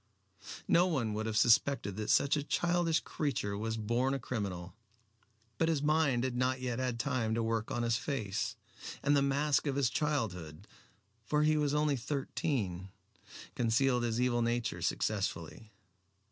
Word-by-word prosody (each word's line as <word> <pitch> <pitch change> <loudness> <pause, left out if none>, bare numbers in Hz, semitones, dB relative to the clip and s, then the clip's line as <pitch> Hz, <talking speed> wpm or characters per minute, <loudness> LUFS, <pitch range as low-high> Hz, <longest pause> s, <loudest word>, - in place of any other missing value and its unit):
No 175 +2 +4
one 125 -11 -1
would 110 +1 -2
have 110 -1 -1
suspected 115 -1 +3
that 105 -1 -3
such 140 - +4
a 145 - 0
childish 170 +2 +1
creature 135 -9 -2
was 110 +2 -2
a - - -5
born 125 +5 0
criminal. 100 -8 -4 0.9
But 165 - +2
his 150 -3 0
mind 150 -5 +2
had 130 -2 -2
not 130 +1 0
yet 125 -1 -3
had 125 -2 -2
time 115 -4 0
to 115 - 0
work 115 -1 -1
on 120 - -2
his 115 -1 +1
face, 110 -10 -3 0.5
and 145 +1 +3
the 140 - +4
mask 140 +2 +1
of 140 - 0
his 135 -4 +1
childhood 100 - -2 0.6
for 150 +6 +1
he 155 0 +3
was 150 -1 +1
only 150 -2 +2
thirteen 115 - -2 0.6
concealed 125 +2 +2
his 115 -1 -1
evil 125 -1 +2
nature 120 -6 -1
successfully. 95 +2 -2
125 Hz, 160 wpm, -32 LUFS, 110-140 Hz, 0.9 s, No